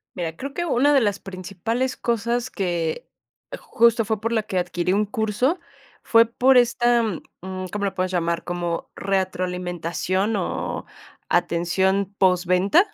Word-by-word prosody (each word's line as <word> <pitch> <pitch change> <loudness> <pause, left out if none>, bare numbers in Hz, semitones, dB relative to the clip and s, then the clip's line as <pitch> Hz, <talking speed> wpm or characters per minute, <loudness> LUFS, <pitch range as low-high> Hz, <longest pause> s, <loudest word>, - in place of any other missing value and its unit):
Mira, 165 -3 -3
creo 275 +9 -6
que 345 - -2
una 290 -1 +3
de 275 - +5
las 205 -3 0
principales 195 +7 -3
cosas, 235 +1 -1
que 175 -1 -2 0.5
justo 230 0 +2
fue 220 0 -1
por 230 +2 -2
la 220 -2 +1
que 195 -3 -3
adquirí 175 0 -1
un 210 +2 +2
curso 220 - 0 0.4
fue 230 0 +5
por 250 +3 +4
esta, 240 0 +3 0.4
mm, 185 0 -5
¿cómo 205 -1 -2
le 195 - 0
puedes 185 0 -2
llamar? 170 -1 -1
Como 175 -1 -3
retroalimentación 185 +1 -1
o - - -3 0.5
atención 185 +3 +1
posventa. 185 - +4
195 Hz, 140 wpm, -23 LUFS, 180-235 Hz, 0.5 s, de